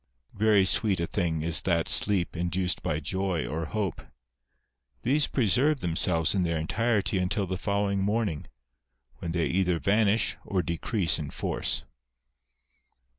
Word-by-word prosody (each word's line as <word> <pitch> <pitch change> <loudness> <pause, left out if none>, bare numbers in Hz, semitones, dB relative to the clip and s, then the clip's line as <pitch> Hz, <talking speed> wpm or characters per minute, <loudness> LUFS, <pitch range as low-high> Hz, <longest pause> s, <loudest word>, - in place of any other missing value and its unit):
Very 105 -2 +3
sweet 100 -1 +1
a 85 - 0
thing 85 -4 -2
is 80 -4 0
that 85 -2 0
sleep 95 -4 +2
induced 90 +1 -1
by 75 - -1
joy 95 +2 -2
or 80 +2 -3
hope. 100 -1 -3 1.0
These 145 +4 +3
preserve 130 +4 +2
^themselves 85 -1 +1
in 95 - +1
their 85 -2 0
entirety 105 +4 0
until 95 +2 0
the 95 0 -3
following 100 -1 0
morning, 100 -6 -1 0.7
when 85 - -4
they 85 -1 0
either 90 -1 +1
vanish 105 +4 +2
or 95 -3 -1
decrease 85 +2 0
in 75 -2 -5
force. - - -1
95 Hz, 135 wpm, -27 LUFS, 85-105 Hz, 1.0 s, Very